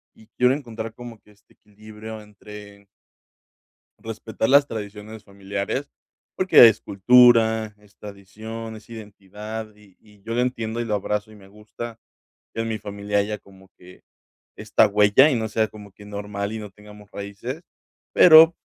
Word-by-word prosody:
y 110 - -20
quiero 125 +1 +4
encontrar 115 -5 -6
como 120 -1 -11
que 105 - -23
este 100 -1 -27
equilibrio 110 +1 -12
entre 105 -1 -14 1.1
respetar 110 0 -4
las 140 +1 +5
tradiciones 105 -1 -8
familiares 100 +7 -5 0.5
porque 185 -10 +7
es 110 - +1
cultura, 110 0 +4
es 105 -1 -25
tradición, 110 +3 -9
es 110 +1 -15
identidad 105 0 -9
y 105 -3 -22
y 105 -2 -23
yo 115 - -5
lo 120 - +1
entiendo 120 -2 -3
y - - -4
lo 105 -2 -1
abrazo, 105 +1 -3
y - - -15
me 100 -2 -17
gusta 110 +3 -10 0.5
que 115 - -3
en 115 - -3
mi 110 -1 -3
familia 100 0 -4
haya 105 +1 -1
como 95 -1 -20
que 90 +1 -17 0.5
esta - - +2
huella, 105 +8 +4
y - - 0
no 110 -1 -2
sea 110 +1 0
como 105 -1 -13
que 105 - -16
normal 100 0 -5
y 110 - -5
no 105 -1 -8
tengamos 105 0 -16
raíces, 100 - -7 0.5
pero 160 0 +8
105 Hz, 160 wpm, -22 LUFS, 100-115 Hz, 1.1 s, pero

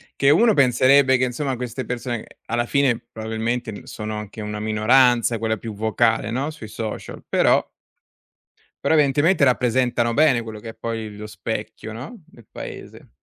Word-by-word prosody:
Che 140 - +3
uno 220 +8 +5
penserebbe 130 0 +5
che 130 - 0
insomma 130 +2 -1
queste 125 +1 -5
persone 120 -1 -4 0.2
alla 120 +1 -1
fine 135 -4 +2
probabilmente 110 +1 -3
n 100 - -10
sono 110 0 -6
anche 105 +1 -8
una 105 0 -5
minoranza, 115 +2 +3
quella 110 0 -1
più 110 +1 -7
vocale, 110 +1 +1
no, 135 +6 -2
sui 135 -8 -10
social, 110 0 -6
però - - +3 1.2
però - - +3
evidentemente 150 +3 +3
rappresentano 125 -2 +2
bene 140 -3 +4
quello 110 -2 -8
che 115 - -8
è 115 - -10
poi 110 -2 -5
lo 105 +1 -8
specchio, 105 +1 -6
no, 145 - -9
del 120 -9 -19
paese. - - -9
120 Hz, 160 wpm, -22 LUFS, 110-130 Hz, 1.2 s, uno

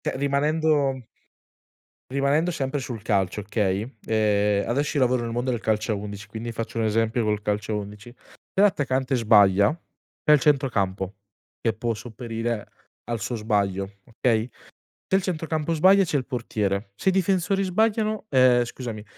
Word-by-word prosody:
cioè - - -3
rimanendo 140 -1 +1 1.1
rimanendo 140 +5 +1
sempre 140 -3 -2
sul 120 -4 -6
calcio, 100 -2 0
okay, 105 +2 -2
ehm, 105 -2 +2
adesso 145 +4 0
io 135 - +4
lavoro 125 -1 +1
nel 115 - -4
mondo 120 +2 -2
del 120 -2 -1
calcio 110 +1 0
a - - -1
11 100 0 -7
quindi, 115 +2 -6
faccio 115 0 -5
un 115 - +1
esempio 115 +2 +1
col 105 -1 0
calcio 105 +1 -2
a - - 0
11. 105 +3 -8 0.4
Se 195 - +2
l'attaccante 135 -9 +2
sbaglia, 100 -4 +5 0.5
c'è 150 - +5
il 150 - +6
centrocampo 105 -9 +1 0.5
che 115 -2 +1
può 115 +1 -2
sopperire 115 0 -4 0.4
al 120 0 -3
suo 120 - -2
sbaglio, 100 -3 -1
okay, 115 0 0 0.6
se 190 - +2
il 195 - 0
centrocampo 160 -3 -2
sbaglia, 190 +5 +5
c'è 160 - -1
il 130 -3 -2
portiere, 105 -5 -2
se 190 - +1
i - - -1
difensori 190 +1 +1
sbagliano 215 +3 0
ehm, 125 -2 +5
scusami, 115 -3 -7
120 Hz, 160 wpm, -24 LUFS, 105-145 Hz, 1.1 s, il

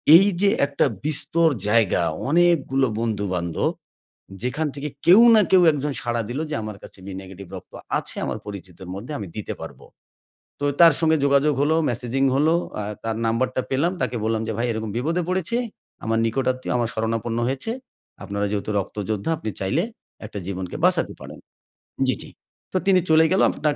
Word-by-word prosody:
এই 190 +4 +8 0.2
যে 200 - +5 0.2
একটা 140 0 +1 0.2
বিস্তর 160 +3 +3 0.2
জায়গা 110 -4 +3 0.3
অনেকগুলো 150 -5 +3
বন্ধু-বান্ধব 100 -7 -1 0.7
যেখান 135 +6 -1
থেকে 145 +1 -4 0.2
কেউ 185 +6 +8
না 220 - +7
কেউ 185 -1 +6
একজন 145 0 -2
সাড়া 120 -1 -1
দিলো 130 +6 -3
যে - - -2
আমার 105 -1 -6
কাছে - - -11
'বি 100 - -7
নেগেটিভ' 95 0 -11
রক্ত 90 - -12 0.3
আছে - - -2
আমার - - -3
পরিচিতর 95 -3 -9
মধ্যে 115 +10 -7
আমি 105 - -5
দিতে 105 - -4
পারব। - - -9 0.8
তো - - -2 0.2
তার 165 -1 +9
সঙ্গে 160 -1 +3
যোগাযোগ 140 +1 +3
হলো, 155 +2 +3
মেসেজিং 125 +3 -1
হলো, 155 +4 +3 0.3
আ - - -2 0.2
তার 115 -1 -1
নাম্বারটা 125 +3 0
পেলাম। 145 +7 +1
তাকে 125 -1 -1
বললাম 110 0 0
যে - - -1
ভাই 120 - 0
এরকম 110 -1 -4
বিপদে 165 +8 0
পড়েছে, 185 +5 0 0.5
আমার 115 +1 +1
নিকটাত্মীয় 130 +2 -1
আমার 120 -2 0
শরণাপন্ন 115 +1 -1
হয়েছে। 135 +11 -2 0.5
আপনারা 100 0 -2
যেহেতু 105 0 -2
রক্তযোদ্ধা 105 - -3
আপনি 130 -8 -4
চাইলে 110 - +1 0.4
একটা 105 - -7
জীবনকে 95 -2 -4
বাঁচাতে - - +3
পারেন - - -10 0.7
জি, 130 - +3
জি। - - -8 0.4
তো - - +2
তিনি 190 -2 +6
চলে 160 0 +6
গেল। 190 - +3
আপনার 150 -2 -1
125 Hz, 170 wpm, -23 LUFS, 110-155 Hz, 0.8 s, তার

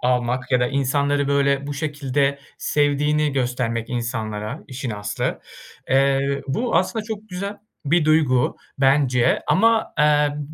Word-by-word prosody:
almak 125 0 0
ya 125 - +4
da 125 - +2
insanları 140 +1 0
böyle 140 0 +1
bu 145 - -4
şekilde 140 -1 -1 0.2
sevdiğini 150 +1 +1
göstermek 120 -3 -1
insanlara 115 0 -4
işin 130 -1 -5
aslı. 105 -1 -3 0.5
Eee, 135 +1 +2
bu 230 - 0
aslında 210 +5 0
çok 215 -1 -7
güzel 200 +2 -5 0.3
bir 155 +2 +2
duygu 150 -6 +2 0.2
bence 135 -3 +3
ama, 225 +2 +3
eee, 150 - +5
ya, 150 -1 +2
140 Hz, 130 wpm, -22 LUFS, 125-150 Hz, 0.5 s, eee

